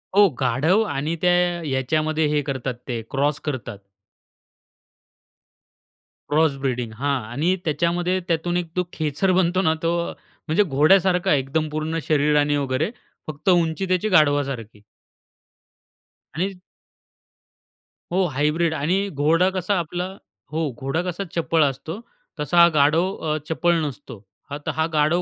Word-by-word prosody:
हो, 205 Hz, -1 st, +7 dB
गाढव 145 Hz, -, +2 dB
आणि 150 Hz, +5 st, -2 dB
त्या 180 Hz, 0 st, +4 dB, 0.4 s
याच्यामध्ये 155 Hz, +4 st, 0 dB
हे 150 Hz, 0 st, +1 dB
करतात, 135 Hz, -2 st, -3 dB
ते 120 Hz, -2 st, -3 dB
क्रॉस 145 Hz, +1 st, 0 dB
करतात. 130 Hz, -8 st, -4 dB, 2.5 s
क्रॉस 150 Hz, -1 st, +3 dB
ब्रीडिंग 125 Hz, -4 st, -2 dB
हां, 140 Hz, 0 st, -1 dB
आणि 165 Hz, +9 st, +1 dB
त्याच्यामध्ये 175 Hz, +4 st, 0 dB
त्यातून 175 Hz, +1 st, 0 dB
एक 175 Hz, -, -1 dB
तो 180 Hz, -, +1 dB
खेचर 155 Hz, +5 st, 0 dB
बनतो 185 Hz, 0 st, +2 dB
ना, 160 Hz, -4 st, +2 dB
तो 165 Hz, -, +2 dB, 0.6 s
म्हणजे 165 Hz, +7 st, +3 dB
घोड्यासारखा 180 Hz, +4 st, +3 dB
एकदम 145 Hz, +3 st, 0 dB
पूर्ण 155 Hz, +2 st, -2 dB
शरीराने 150 Hz, -1 st, +2 dB
वगैरे, 140 Hz, -, -1 dB, 0.4 s
फक्त 155 Hz, +5 st, -3 dB
उंची 175 Hz, +1 st, +2 dB
त्याची 185 Hz, +4 st, +1 dB
गाढवासारखी. 140 Hz, -, +1 dB, 1.5 s
आणि 190 Hz, +4 st, -1 dB, 1.6 s
हो, 185 Hz, +1 st, +2 dB
हायब्रिड 155 Hz, +4 st, +1 dB
आणि 180 Hz, +7 st, 0 dB
घोडा 165 Hz, +5 st, +2 dB
कसा 190 Hz, +2 st, -1 dB
आपला 175 Hz, +2 st, -3 dB, 0.5 s
हो, 160 Hz, -1 st, -1 dB
घोडा 135 Hz, +6 st, -1 dB
कसा 180 Hz, +2 st, -3 dB
चपळ 165 Hz, -1 st, +2 dB
असतो, 145 Hz, -, -3 dB, 0.4 s
तसा 160 Hz, +4 st, -1 dB
हा 170 Hz, -, +9 dB
गाढव 160 Hz, +6 st, +3 dB, 0.2 s
अ, 155 Hz, -, +1 dB
चपळ 170 Hz, +2 st, +2 dB
नसतो. 130 Hz, -6 st, -8 dB, 0.3 s
हा 145 Hz, -, -4 dB
त -, -, +1 dB
हा 160 Hz, 0 st, +1 dB
गाढव 155 Hz, +4 st, +2 dB
155 Hz, 130 wpm, -22 LUFS, 145-175 Hz, 2.5 s, हा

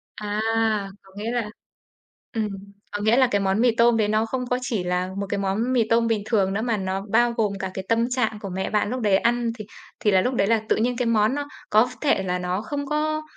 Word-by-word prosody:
À, 210 Hz, 0 st, -3 dB, 0.6 s
có 195 Hz, -, -20 dB
nghĩa 220 Hz, +3 st, -3 dB
là 235 Hz, -3 st, -2 dB, 0.8 s
ừm, 220 Hz, -2 st, 0 dB, 0.4 s
có 205 Hz, 0 st, -3 dB
nghĩa 220 Hz, +3 st, +4 dB
là 260 Hz, -1 st, +5 dB
cái 205 Hz, -, +2 dB
món 195 Hz, +3 st, +1 dB
mì 240 Hz, -2 st, +3 dB
tôm 235 Hz, 0 st, +4 dB
đấy 215 Hz, -, +2 dB
nó 215 Hz, +1 st, +1 dB
không 250 Hz, +3 st, -3 dB
có 250 Hz, -, +1 dB
chỉ 225 Hz, -7 st, -2 dB
là 180 Hz, +1 st, -1 dB
một 200 Hz, -, -3 dB
cái 205 Hz, -, -1 dB
món 205 Hz, +6 st, 0 dB
mì 240 Hz, -, +4 dB
tôm 230 Hz, 0 st, +3 dB
bình 220 Hz, -3 st, 0 dB
thường 200 Hz, -4 st, +1 dB
nữa 220 Hz, -, -1 dB
mà 230 Hz, -2 st, 0 dB
nó 190 Hz, 0 st, -2 dB
bao 240 Hz, +1 st, +4 dB
gồm 215 Hz, -3 st, 0 dB
cả 190 Hz, -1 st, -4 dB
cái 190 Hz, 0 st, -5 dB
tâm 230 Hz, +2 st, +2 dB
trạng 250 Hz, -4 st, 0 dB
của 195 Hz, -, -5 dB
mẹ 190 Hz, +1 st, -3 dB
bạn 210 Hz, -1 st, +1 dB
lúc 250 Hz, +2 st, -3 dB
đấy 205 Hz, -3 st, +4 dB
ăn 235 Hz, +2 st, +1 dB
thì 215 Hz, -, -6 dB, 0.3 s
thì 210 Hz, -, +2 dB
là 190 Hz, -, +4 dB
lúc 250 Hz, +6 st, 0 dB
đấy 200 Hz, -5 st, +1 dB
là 225 Hz, -1 st, +3 dB
tự -, -, +4 dB
nhiên 240 Hz, +2 st, 0 dB
cái 250 Hz, -, 0 dB
món 225 Hz, +2 st, +2 dB
nó 290 Hz, 0 st, -3 dB, 0.2 s
có 220 Hz, +4 st, +4 dB
thể 280 Hz, -10 st, +2 dB
là 180 Hz, -1 st, -1 dB
nó 180 Hz, +3 st, -2 dB
không 285 Hz, +5 st, -4 dB
có 310 Hz, +1 st, -1 dB
220 Hz, 255 wpm, -24 LUFS, 200-240 Hz, 0.8 s, là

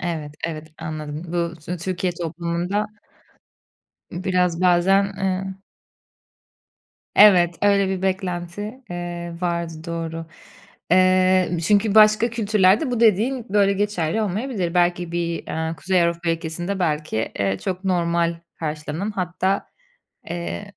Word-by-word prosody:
Evet, 160 Hz, -4 st, -4 dB
evet, 155 Hz, -2 st, -4 dB
anladım. 155 Hz, -1 st, -5 dB
Bu 170 Hz, -1 st, -1 dB
Tü 175 Hz, +4 st, -5 dB
Türkiye 180 Hz, +1 st, -2 dB
toplumunda 170 Hz, +4 st, -2 dB, 1.3 s
biraz, 180 Hz, -1 st, 0 dB
bazen, 185 Hz, +2 st, +4 dB
ııı 190 Hz, 0 st, -2 dB, 1.6 s
Evet. 175 Hz, -5 st, +6 dB
Öyle 200 Hz, -1 st, +4 dB
bir 190 Hz, -1 st, -2 dB
beklenti, 190 Hz, +4 st, -3 dB
eee, 175 Hz, -1 st, -5 dB
vardı, 170 Hz, -2 st, -1 dB
doğru. 165 Hz, -1 st, -4 dB, 0.6 s
Eee, 185 Hz, -1 st, +4 dB
çünkü 205 Hz, 0 st, +3 dB
başka 215 Hz, +2 st, +6 dB
kültürlerde 215 Hz, +2 st, +3 dB
bu 240 Hz, -2 st, -1 dB
dediğin 230 Hz, +3 st, +3 dB
böyle 200 Hz, 0 st, +3 dB
geçerli 205 Hz, -1 st, 0 dB
olmayabilir. 200 Hz, -3 st, -2 dB
Belki 175 Hz, -1 st, +1 dB
bir, 170 Hz, -1 st, -2 dB
ııı, 160 Hz, +1 st, -3 dB
Kuzey 180 Hz, +3 st, +1 dB
Avrupa 170 Hz, 0 st, 0 dB
ülkesinde 175 Hz, +4 st, -3 dB
belki, 150 Hz, -9 st, -1 dB
ııı, 95 Hz, -1 st, 0 dB
çok 185 Hz, 0 st, -4 dB
normal 170 Hz, -2 st, +1 dB, 0.2 s
karşılanan 155 Hz, +5 st, -3 dB
hatta, 190 Hz, 0 st, -1 dB, 0.7 s
ııı, 175 Hz, +4 st, -4 dB
180 Hz, 115 wpm, -22 LUFS, 170-195 Hz, 1.6 s, Evet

